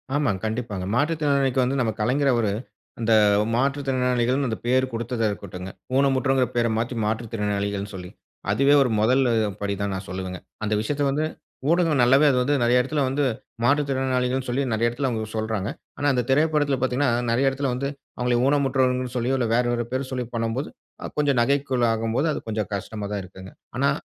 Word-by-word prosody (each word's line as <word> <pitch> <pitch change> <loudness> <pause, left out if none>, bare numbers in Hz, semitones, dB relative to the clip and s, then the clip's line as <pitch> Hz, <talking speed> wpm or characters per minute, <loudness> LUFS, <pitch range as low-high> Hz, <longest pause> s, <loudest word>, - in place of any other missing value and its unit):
ஆமாங்க 140 -10 +1
கண்டிப்பாங்க. 110 -4 -3
மாற்றுத்திறனாளிக்கு 140 -3 +1
வந்து 130 +2 0
நம்ம 115 -3 +1
கலைஞர் 135 +5 +2
அவரு, 115 -4 +1 0.5
அந்த 115 0 +2 0.4
மாற்றுத்திறனாளிகள்னு 130 -1 +1
அந்த 110 - -2
பேரு 130 +1 +3
குடுத்ததா 115 0 -2
இருக்கட்டுங்க. 95 -2 -7 0.2
ஊனமுற்றவங்கன்ன 135 -2 +2
பெர 120 0 +3
மாற்றி 115 +2 -2
மாற்றுத்திறனாளிகள்னு 105 -2 -2
சொல்லி. 90 -1 -7 0.4
அதுவே 140 +7 +4
ஒரு 130 - +3
மொதலு 125 +3 +3 0.3
படி 100 0 -1
தான் 100 -1 -1
நான் 95 0 -5
சொல்லுவேங்க. 95 -1 -5 0.2
அந்த 105 0 0
விஷயத்த 145 +6 -1
வந்து 150 +3 0 0.4
ஊடகம் 165 -4 +3
நல்லாவே 135 +5 +5
அது 125 - +1
வந்து 145 +3 +2
நெறைய 125 +1 +4
இடத்துல 145 +3 -1
வந்து 140 +2 0 0.4
மாற்றுத்திறனாளிகள்னு 130 -2 +1
சொல்லி 135 +3 0
நெறைய 115 +2 +2
இடத்தில 130 +3 -2
அவங்க 110 -2 -3
சொல்றாங்க. 110 -2 -2 0.3
ஆனா 145 - 0
அந்த 125 -1 +1
திரைப்படத்ல 150 0 +2
பார்த்தீங்கன்னா 130 +1 +1 0.2
நெறைய 130 +4 +3
இடத்துல 135 0 -2
வந்து 140 +2 -2 0.3
அவங்கள 125 0 +1
ஊனமுற்றவர்கள்னு 130 -3 +1
சொல்லியோ 125 +3 +1
இல்ல 120 - 0
வேறு 120 0 +2
ஒரு 120 -1 -2
பெயர் 130 +1 -2
சொல்லி 125 -1 -2
பண்ணும்போது 115 +4 -2 0.4
அ - - -4
கொஞ்சம் 140 -4 +2
நகைப்புக்குள் 130 -1 +1
ஆகும்போது 115 +7 0
அது - - -3
கொஞ்சம் 105 -1 -2
கஷ்டமா 105 +1 -5
தான் 100 -2 -3
இருக்குங்க. 95 0 -12 0.3
ஆனா 140 +2 +3
125 Hz, 165 wpm, -24 LUFS, 110-135 Hz, 0.5 s, நல்லாவே